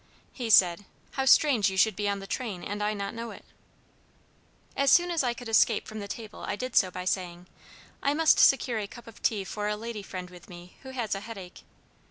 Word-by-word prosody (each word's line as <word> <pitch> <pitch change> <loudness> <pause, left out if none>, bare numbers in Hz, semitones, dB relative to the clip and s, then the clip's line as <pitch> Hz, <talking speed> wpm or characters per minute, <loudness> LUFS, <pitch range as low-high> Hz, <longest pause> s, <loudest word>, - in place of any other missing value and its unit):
He 240 -3 -4
said, 185 -2 +5 0.3
'How 265 - -2
strange 265 -6 +5
you 190 - -5
should 215 +1 +4
be 205 +1 -1
on 200 - -1
the 195 - -8
train 205 -5 -4
and 205 +1 -4
I 210 +1 0
not 200 -1 -4
know 230 0 -6
it!' - - -12 1.3
"As 275 0 +2
soon 350 0 +5
as 335 - +1
I 240 -1 0
could 245 0 -9
escape 225 0 +3
from 215 - -7
the 200 - -6
table, 215 0 -8
I - - -3
did 255 +3 -6
so 185 - +5
by 180 0 -7
saying, 180 -1 -2 0.6
'I 280 +1 +1
must 320 0 +4
secure 250 -4 +4
a 205 - -4
cup 240 +3 -13
of 230 -1 -14
tea 210 -3 0
for 205 +2 -4
a 210 - 0
lady 225 -1 -6
friend 185 -2 -8
with 180 -1 -14
me 175 0 -12
who 265 - -10
has 245 -4 -3
a 195 - -2
head 225 +2 -9
ache.' 180 -2 -11
210 Hz, 235 wpm, -28 LUFS, 195-240 Hz, 1.3 s, said